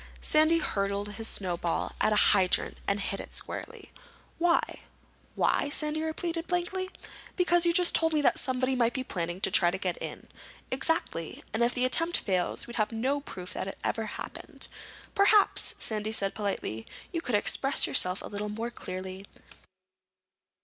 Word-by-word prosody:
Sandy 310 +2 +3
hurled 200 -7 -1
his 220 +2 -6
snowball 175 -5 -2
at - - +3
a - - +3 0.2
hydrant 190 -3 +2
and 200 +1 +1
hit 195 0 -3
it - - -8
squarely. - - -6 0.5
"Why?" 340 0 +1 0.6
"Why?" - - +1
Sandy 300 +1 0
repeated 330 +1 -3
blankly. 360 +1 -1 0.5
"Because 350 -1 +3
you - - +5
just 350 +1 +4
told 325 0 +3
me 305 -2 +1
somebody 260 0 +1
might 240 -1 +1
be 260 - -1
planning 175 -6 -4
to - - +2
try 175 - +5
to 185 - -3
get 185 -2 -2
in." - - -6 0.5
"Exactly. 260 - -1
And 220 - -1
if 235 +1 +2
the 250 0 +2
attempt 330 +6 +2
fails, 185 -3 -1
we'd 240 - -8
have 215 0 +1
no 260 +6 0
proof 180 -9 -8
that - - -4
it 195 - -6
ever 225 -1 -1
happened." - - -8 0.5
"Perhaps," 405 0 +4
Sandy 215 -1 -1
said 195 -3 +1
politely, 195 - -3 0.3
"you 335 - -1
could 250 -8 -1
express 270 +6 +4
yourself 180 +1 +3
a - - -6
little 210 +1 -4
more 225 +3 -4
clearly. 185 -1 -7
230 Hz, 165 wpm, -29 LUFS, 195-315 Hz, 0.6 s, you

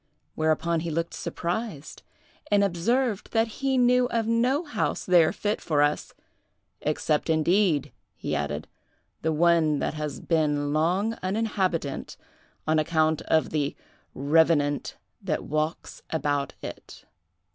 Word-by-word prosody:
Whereupon 160 +1 +1
he 165 +1 -3
looked 165 +1 -2
surprised, 175 -4 -4 0.5
and 205 -1 +4
observed 210 +5 0
that 225 0 +3
he 270 -1 +1
knew 250 0 +4
of 230 -2 -1
no 245 +7 +2
house 290 -10 -2
there 175 -3 +5
fit 210 +1 -2
for 150 -3 +2
us, 145 0 -1 0.7
'except, 150 +1 0
indeed,' 160 -2 +2 0.2
he 75 - -3
added, 75 +1 -3 0.5
'the 160 - 0
one 165 -2 +3
that - - -1
has 150 -2 -4
been 150 -3 0
long 180 +8 +1
uninhabited, 185 -7 -1 0.5
on 155 0 +2
account 155 0 +1
of 160 - +2
the 145 -2 -1 0.4
revenant 145 0 +2 0.2
that - - -2
walks 155 +2 -3
about 145 -3 -1
it. - - -9
165 Hz, 125 wpm, -26 LUFS, 150-205 Hz, 0.7 s, there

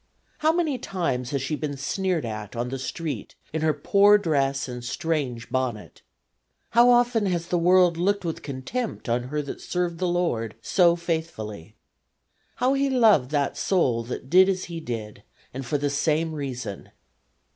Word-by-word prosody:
How 310 +1 +4
many 320 -6 0
times 135 - -2
has 140 -2 -2
she 145 +3 -1
been 145 -2 -4
sneered 175 +2 -1
at 110 -1 -6
on 120 +1 -2
the 135 +1 -4
street 155 +3 -5 0.2
in 160 - -1
her 160 0 +3
poor 200 +8 +5
dress 140 -8 0
and 125 -1 -7
strange 130 -3 -2
bonnet! 125 -5 -3 0.7
How 240 +1 +6
often 240 -3 +3
has 170 -2 -2
the 175 - +1
world 180 0 +4
looked 200 +2 0
with 165 - -3
contempt 145 - -4
on 120 +1 0
her 150 +3 -2
that 140 - -7
served 175 -2 -2
the 185 - 0
Lord 170 -11 -1
so 175 -3 +3
faithfully. 160 - -4 0.8
How 255 +2 +2
He 275 0 +1
loved 220 - +4
that 145 -2 0
soul 130 -12 +1
that 125 +2 -6
did 185 +6 +6
as 185 -1 -1
He 170 -1 -6
did 110 -8 -6 0.3
and 135 +1 -5
for 140 +4 -1
the 145 0 -1
same 155 +3 0
reason. 125 -8 -5
155 Hz, 165 wpm, -25 LUFS, 130-185 Hz, 0.8 s, How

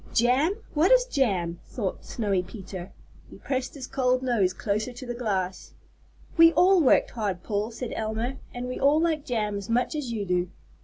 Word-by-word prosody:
"Jam! 260 - +3 0.2
what 320 +7 +3
is - - +6
jam?" 190 - 0
thought 205 -7 -4
Snowy 200 -5 -1
Peter. 185 -1 -8 0.4
He - - -12
pressed 265 +3 -3
his 270 -3 -6
cold 255 -1 +1
nose 225 -8 +2
closer 210 +5 -2
to 245 +2 -9
the 240 - -4
glass. 195 -6 -3 0.6
"We 330 0 +8
all 370 0 +5
worked 275 - +4
hard, 200 -6 -3
Paul," 210 0 -1
said 235 +1 -6
Elma, 225 +4 -3
"and 245 0 -5
we 255 - -4
all 285 +3 +4
like 320 -3 0
jam 215 -6 -1
as 200 +1 -7
much 245 +5 +1
as 295 -6 -3
you 215 -3 -2
do. 180 -1 0
240 Hz, 185 wpm, -26 LUFS, 200-270 Hz, 0.6 s, We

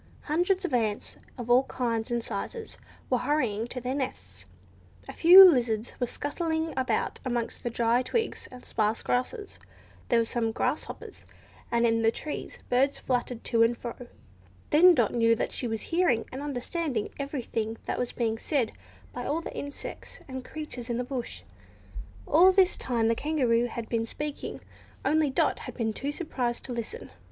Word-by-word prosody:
Hundreds 360 +5 +1
of 300 - -3
ants, 220 -4 -1 0.2
of 240 -2 -6
all 245 +1 +6
kinds 230 -4 -2
and 240 -1 -1
sizes, 235 - -5 0.3
were 250 - +1
hurrying 240 -6 0
to 250 - -5
their 250 +1 -3
nests; 95 - -5 0.6
a - - -7
few 370 +3 +10
lizards 240 -7 +1
were 245 - 0
scuttling 320 +3 -2
about 260 0 -1
amongst 240 -3 -2
the 240 - -2
dry 235 +1 +2
twigs 445 - -2
and 250 -1 -12
sparse 215 0 0
grasses; 395 - -2 0.5
there 235 - +4
were 230 - +3
some 225 -1 -1
grasshoppers, - - -4 0.4
and 235 0 +3
in 225 -1 +2
the 225 - +4
trees 295 +6 -5
birds 270 +3 +2
fluttered 245 -2 -2
to 230 -2 +1
and 230 +1 +4
fro. 235 -1 -5 0.8
Then 345 +4 +7
Dot 235 -6 +2
knew 230 -1 +4
that - - -2
she 245 - -3
was 225 -1 -3
hearing, 330 -10 +1
and 265 - -6
understanding, 285 -2 -2
everything 235 -5 -3
that - - -2
was 245 - -1
being 225 -2 -1
said 270 -6 0 0.4
by 245 0 -5
all 315 +3 0
the - - -8
insects 285 0 -7
and 260 -1 -6
creatures 260 -5 -7
in 235 - -1
the 250 - -1
bush. 250 -1 -5 0.8
All 350 +5 +6
this 375 -1 +4
time 235 -3 0
the 230 - +3
Kangaroo 245 -4 +1
had 235 -1 -6
been 230 -1 -1
speaking, 295 +4 -5 0.4
only 310 -1 +3
Dot 265 - +1
had - - -8
been 225 -3 -1
too 280 +6 -3
surprised 255 -7 -3
to 255 - -4
listen. 240 - -6
245 Hz, 170 wpm, -28 LUFS, 230-295 Hz, 0.8 s, few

